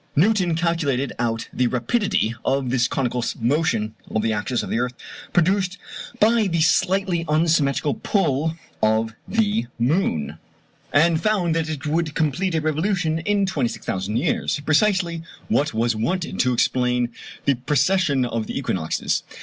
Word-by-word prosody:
Newton 180 0 +3
calculated 160 -6 0
out 115 -2 -1
the 125 - +1
rapidity 125 - 0
of 135 -2 0
this 125 -1 +2
conical 125 -2 -1 0.2
motion 120 -4 0 0.2
of 110 - -1
the 110 -1 +1
axis 105 +4 -1
of - - -6
the 115 - +1
earth, 125 0 -2 0.4
produced 185 +2 +2 0.4
by 220 0 +4
the 170 -3 0
slightly 180 +1 +2
unsymmetrical 150 -2 +2
pull 160 - 0 0.2
of 110 +1 +2
the 210 - +1
moon, 120 - 0 0.5
and 160 +2 +3
found 195 -6 +1
that 160 -1 -1
it 155 -1 -5
would 155 0 -1
complete 165 +4 0
a 160 - +1
revolution 160 +1 0
in 200 +3 +1
26,000 115 - -2
years 150 +1 0
precisely 170 0 +2 0.3
what 150 +2 +2
was 115 +1 0
wanted 170 +11 -2
to 125 - +3
explain 125 0 +1 0.4
the 140 - +4
precession 140 +2 +1
of 115 -2 -3
the - - -4
equinoxes. 95 - -1
155 Hz, 140 wpm, -22 LUFS, 125-175 Hz, 0.5 s, by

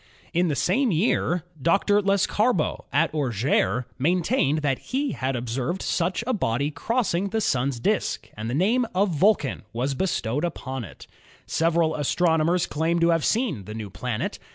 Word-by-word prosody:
In 175 +1 +2
the 150 - 0
same 225 - +2
year 175 -1 +1 0.2
Dr. 200 +6 +3
Lescarbault 200 -1 +1
at 155 +3 +2
Or 145 -4 0
geres 115 0 +1 0.2
maintained 160 - +1
that 135 -3 +1
he 270 +1 -2
had 130 0 -2
observed 125 +9 -3
such 180 +5 0
a 255 - 0
body 140 - 0
cross 220 - -1
ing 190 +4 0
the 225 - -1
Sun's 130 - 0
disk, - - -1
and 110 +2 -5
the 120 - -1
name 225 - +2
of 200 +2 +3
Vulcan 170 - +2
was 130 +4 -1
bestowed 140 - -1
upon 135 -7 -4
it. 95 - -11 0.4
Several 165 -1 +1
astronomers 165 +3 +2
claimed 165 +3 0
to 170 - +4
have 165 -2 +2
seen 210 - 0
the 105 +2 -7
new 105 -3 -6
planet. 110 +5 -3
160 Hz, 165 wpm, -25 LUFS, 130-190 Hz, 0.4 s, to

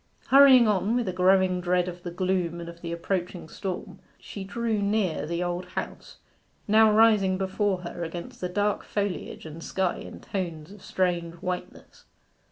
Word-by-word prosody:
Hurrying 265 -3 +8
on, 210 +2 +1
with 245 -4 0
a 185 - -2
growing 185 0 +3
dread 180 0 +1
of 175 0 -7
the 175 - -5
gloom 180 -1 -1
and 170 - -7
of 170 0 -10
the 170 - -5
approaching 175 0 -3
storm, 185 +3 -6 0.2
she 200 - -8
drew 220 +2 -2
near 200 -7 0
the 170 +2 -2
Old 175 +1 -3
House, 180 - -7 0.5
now 220 +1 +6
rising 210 -4 +4
before 190 0 -1
her 175 0 -6
against 170 +1 -7
the 180 - -2
dark 205 +3 0
foliage 200 -6 -4
and 160 +1 -9
sky 190 -2 -1
in - - -9
tones 170 -4 -5
of 205 -1 -13
strange 175 -2 -1
whiteness. 180 +1 -7
185 Hz, 170 wpm, -26 LUFS, 175-205 Hz, 0.5 s, Hurrying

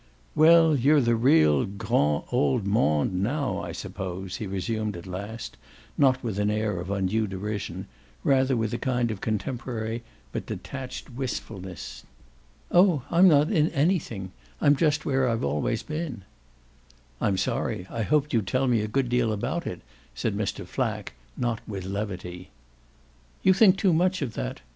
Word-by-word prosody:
"Well, 160 0 +6
you're 140 +4 +4
in 140 - +4
the 120 0 +3
real 80 - +4
'grand' 75 -7 0
old 75 +8 +1
monde 75 -6 +2
now, 140 +7 -1
I - - -5
suppose," 95 0 -5
he 110 - -4
resumed 105 +2 -2
at 85 - -10
last, 100 +5 -6 0.4
not 130 -2 +3
with 110 -4 -2
an 105 0 +2
air 105 -3 -1
of 90 +2 -6
undue 100 +2 0
derision 100 +2 -4 0.4
rather 130 -1 +3
with 115 -1 -1
a 120 - -2
kind 125 -2 0
of 105 - -6
contemporary 110 +1 -3 0.3
but - - -5
detached 130 -1 -6
wistfulness. 95 - -6 0.7
"Oh 175 -6 +5
I'm 175 +2 +6
not 150 -2 +5
in 155 0 +3
anything; 140 - 0 0.3
I'm 145 -1 +5
just 155 +1 +1
where 135 -2 +2
I've 115 0 -1
always 75 - -1
been." 150 - -5 1.0
"I'm 100 -2 +1
sorry; 95 -1 -1
I 115 - -4
hoped 150 +6 +1
you'd 110 -5 +1
tell 130 +4 +1
me 120 -3 +3
a 105 - -2
good 125 +2 -1
lot 120 -2 +2
about 105 -1 -2
it," - - -5 0.3
said - - -1
Mr. - - -3
Flack, - - -3 0.2
not 120 -2 -1
with 95 -3 -5
levity. 95 -3 -5 0.9
"You 190 - +6
think 190 -1 +6
too 195 -3 +3
much 180 0 +2
of 120 -5 -4
that. - - -4
115 Hz, 160 wpm, -26 LUFS, 95-140 Hz, 1.0 s, Well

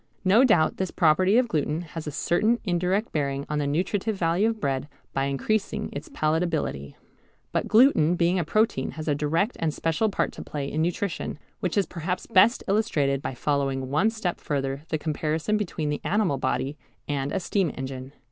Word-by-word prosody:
No 205 +7 +6
doubt 210 -11 +3
this 190 -1 -1
property 185 +7 +3
of 250 -1 +3
gluten 155 -3 -1
has 165 -2 -7
a - - -2
certain 210 +11 +2
indirect 185 +3 0
bearing 140 -2 -1
on 150 0 -1
the 145 - 0
nutritive 190 +8 0
value 180 +4 +2
of 225 -1 -4
bread 135 -2 -1 0.3
by 135 - 0
increasing 195 +10 -1
its 145 +2 -7
palatability. 155 - -1 0.6
But - - -1
gluten 215 - +5
being 175 +1 +2
a - - +1
protein 170 -5 +1
has 155 0 -7
a 150 - +3
direct 160 - 0
and 160 -2 +1
special 165 +8 0
part - - 0
to - - -9
play 140 -2 -4
in 155 - -1
nutrition, 175 -1 -2 0.2
which 185 +2 -2
is 200 - +3
perhaps 180 +1 -4
best 220 +2 +4
illustrated 150 - +1
by 130 - -4
following 135 -1 -1
one 185 +10 +3
step 215 -6 -3
further 135 -1 -2
the 155 - 0
comparison 155 +5 -1
between 170 -7 -2
the 145 - -3
animal 195 - +1
body 135 +4 -1 0.3
and 140 -1 -2
a - - 0
steam 185 -2 0
engine. 130 0 -6
160 Hz, 185 wpm, -26 LUFS, 145-195 Hz, 0.6 s, No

